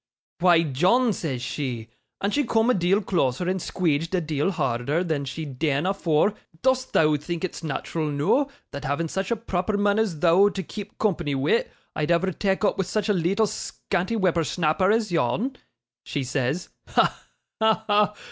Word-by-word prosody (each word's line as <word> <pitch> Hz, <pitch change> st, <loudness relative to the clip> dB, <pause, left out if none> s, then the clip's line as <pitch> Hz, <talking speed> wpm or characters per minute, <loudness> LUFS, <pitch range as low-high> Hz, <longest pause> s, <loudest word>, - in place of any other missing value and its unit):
"Why, 175 Hz, -2 st, +5 dB
John," 185 Hz, -, +2 dB
says 135 Hz, -9 st, -4 dB
she 125 Hz, -5 st, -4 dB, 0.3 s
and 200 Hz, +1 st, -1 dB
she 290 Hz, -, +2 dB
coom 230 Hz, -1 st, +2 dB
a -, -, +3 dB
deal 190 Hz, +2 st, +2 dB
closer 165 Hz, -3 st, 0 dB
and 185 Hz, +1 st, 0 dB
squeedged 165 Hz, -1 st, -1 dB
a -, -, +2 dB
deal 155 Hz, 0 st, -1 dB
harder 135 Hz, 0 st, 0 dB
than 155 Hz, -5 st, -2 dB
she'd 135 Hz, -1 st, -6 dB
deane 150 Hz, 0 st, +1 dB
afore 185 Hz, -1 st, +2 dB, 0.3 s
"dost 260 Hz, 0 st, +1 dB
thou 155 Hz, -1 st, +4 dB
think 170 Hz, +4 st, -5 dB
it's 185 Hz, -, -4 dB
nat'ral 155 Hz, +1 st, -3 dB
noo, 150 Hz, -, +2 dB, 0.3 s
that 140 Hz, -1 st, -6 dB
having 145 Hz, +4 st, -1 dB
such 190 Hz, +3 st, -3 dB
a 235 Hz, -, +2 dB
proper 205 Hz, -2 st, -2 dB
mun 205 Hz, +1 st, +2 dB
as 205 Hz, -8 st, 0 dB
thou 180 Hz, +5 st, +5 dB
to 195 Hz, -1 st, -4 dB
keep 205 Hz, +4 st, -8 dB
company 170 Hz, -9 st, 0 dB
wi', 140 Hz, -, +2 dB, 0.3 s
I'd 150 Hz, 0 st, -1 dB
ever 175 Hz, +2 st, +2 dB
tak' 195 Hz, +3 st, 0 dB
opp -, -, +1 dB
wi' -, -, +3 dB
such 210 Hz, +4 st, -2 dB
a -, -, +4 dB
leetle 190 Hz, +4 st, +2 dB
scanty 190 Hz, 0 st, -3 dB
whipper 180 Hz, -5 st, +2 dB
snapper 165 Hz, +3 st, +1 dB
as 215 Hz, -2 st, +2 dB
yon?" 180 Hz, -, 0 dB, 0.5 s
she 140 Hz, -, -3 dB
says. 135 Hz, +5 st, -2 dB, 0.2 s
Ha! -, -, +1 dB, 0.4 s
ha! 220 Hz, 0 st, +3 dB
ha! 210 Hz, 0 st, +2 dB
175 Hz, 180 wpm, -25 LUFS, 150-205 Hz, 0.5 s, Why